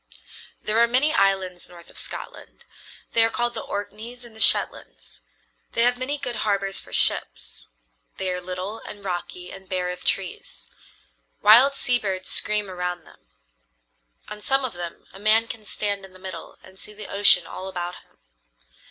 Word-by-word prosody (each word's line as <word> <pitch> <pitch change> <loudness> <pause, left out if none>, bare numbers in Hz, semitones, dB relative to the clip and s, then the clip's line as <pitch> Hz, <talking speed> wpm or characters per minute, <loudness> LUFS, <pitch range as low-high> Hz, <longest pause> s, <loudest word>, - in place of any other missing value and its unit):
There 215 +1 +2
are 235 - +6
many 265 +6 +3
islands 190 - +1
north 170 -1 -14
of - - -15
Scotland. - - -8 0.5
They 230 - +6
are 225 - +4
called 240 +1 -1
the 225 - -4
Orkneys 225 +4 -6
and 230 -2 -13
the - - -11
Shetlands. - - +2 0.5
They 230 - +3
have 245 +1 +4
many 275 +3 -1
good 245 -5 -4
harbors 200 -2 0
for - - -10
ships. - - +1 0.5
They 190 -1 -1
are 180 0 -3
little 185 +4 -5
and 205 -1 -10
rocky 180 0 -4
and 190 -1 -12
bare 180 -1 -1
of 180 0 -8
trees. 190 -2 -2 0.7
Wild 250 +6 +8
sea 245 -2 +1
birds 190 -4 -3
scream 210 -1 +1
around 180 -1 -4
them. - - -20 1.0
On 210 - -8
some 270 +4 +2
of 250 - -4
them 175 -1 -7
a 195 - -11
man 220 +2 +4
can 220 -2 -7
stand 200 -1 -2
in 190 -1 -11
the - - -13
middle 185 -3 -8
and 190 0 -16
see 210 - -7
the 215 - -7
ocean 200 -3 +5
all 185 - -7
about 175 -1 -4
him. - - -20
200 Hz, 175 wpm, -24 LUFS, 185-225 Hz, 1.0 s, Wild